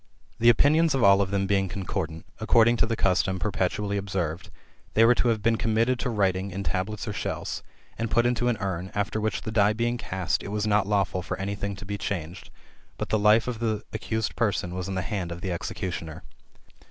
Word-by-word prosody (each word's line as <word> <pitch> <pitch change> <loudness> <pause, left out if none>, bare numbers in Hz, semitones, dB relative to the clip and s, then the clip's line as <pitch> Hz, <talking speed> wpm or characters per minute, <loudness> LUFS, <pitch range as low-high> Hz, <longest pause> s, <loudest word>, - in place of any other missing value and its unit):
The 120 +1 +6
opinions 150 +6 +4
of 130 - +1
all 100 0 +6
of 95 - 0
them 100 0 0
being 95 -1 +1
concordant, 85 -3 -4
according 115 +1 +4
to 115 - +1
a - - +2
custom 95 -2 +1
perpetually 100 +1 -1
observed, 95 -4 -3 0.5
they 115 - +6
were 120 - +7
to 125 - 0
have 110 -3 +1
been 115 +1 +3
committed 115 +3 +1
to 125 - -1
writing 95 -3 0
[in 100 +1 -5
tablets 100 +3 -2
or 105 - -2
shells], - - -4 0.4
and 115 0 -1
put 120 +3 +3
into 120 0 +1
an 120 -2 +1
urn, 95 -2 -3
after 105 +2 -1
which 110 -1 -1
the 110 - -4
die 105 -1 +4
being 120 +2 -1
cast, 95 -6 -1
it - - -7
was 105 +1 -1
not 105 -2 +2
lawful 100 -3 +1
for - - -4
any 100 +1 -3
thing 100 0 -4
to 95 +1 -10
be 100 +1 -4
changed, 90 -3 -4 0.5
but - - -4
the 110 - +2
life 105 +2 +4
of 120 -3 -3
the 110 -2 -1
accused 110 -1 -2
person 95 -5 0
was 90 0 -4
in 95 - -3
the 95 - -1
hands 90 -1 -3
of 85 +1 -6
the 95 - -3
execu 90 +1 -3
tioner. 80 +1 -8
100 Hz, 220 wpm, -26 LUFS, 95-110 Hz, 0.5 s, were